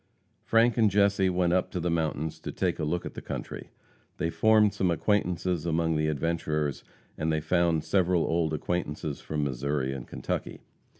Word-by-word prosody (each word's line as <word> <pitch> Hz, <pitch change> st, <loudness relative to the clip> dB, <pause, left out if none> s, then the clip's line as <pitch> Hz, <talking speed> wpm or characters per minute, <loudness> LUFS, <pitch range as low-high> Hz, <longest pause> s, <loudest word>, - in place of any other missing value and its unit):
Frank 115 Hz, +1 st, +3 dB
and 110 Hz, -3 st, +5 dB
Jesse 100 Hz, -1 st, +3 dB
went 90 Hz, -1 st, +1 dB
up 90 Hz, 0 st, +1 dB
to 90 Hz, -, -4 dB
the 85 Hz, 0 st, -1 dB
mountains 80 Hz, -1 st, -1 dB
to -, -, -6 dB
take -, -, -1 dB
a -, -, -1 dB
look 85 Hz, +3 st, -1 dB
at -, -, -6 dB
the -, -, -7 dB
country. -, -, -6 dB, 0.5 s
They 85 Hz, -, -1 dB
formed 110 Hz, 0 st, +4 dB
some 95 Hz, -3 st, 0 dB
acquaintances 90 Hz, -2 st, 0 dB
among 80 Hz, -1 st, +1 dB
the 75 Hz, 0 st, +1 dB
adventurers, 75 Hz, -1 st, -1 dB, 0.4 s
and 80 Hz, +1 st, 0 dB
they 80 Hz, -, +1 dB
found 85 Hz, 0 st, +1 dB
several 90 Hz, -2 st, +2 dB
old 80 Hz, -1 st, 0 dB
acquaintances 75 Hz, -2 st, -3 dB
from 75 Hz, -1 st, -2 dB
Missouri 70 Hz, 0 st, -1 dB
and 65 Hz, -2 st, -7 dB
Kentucky. 65 Hz, -, -4 dB
85 Hz, 175 wpm, -28 LUFS, 75-90 Hz, 0.5 s, and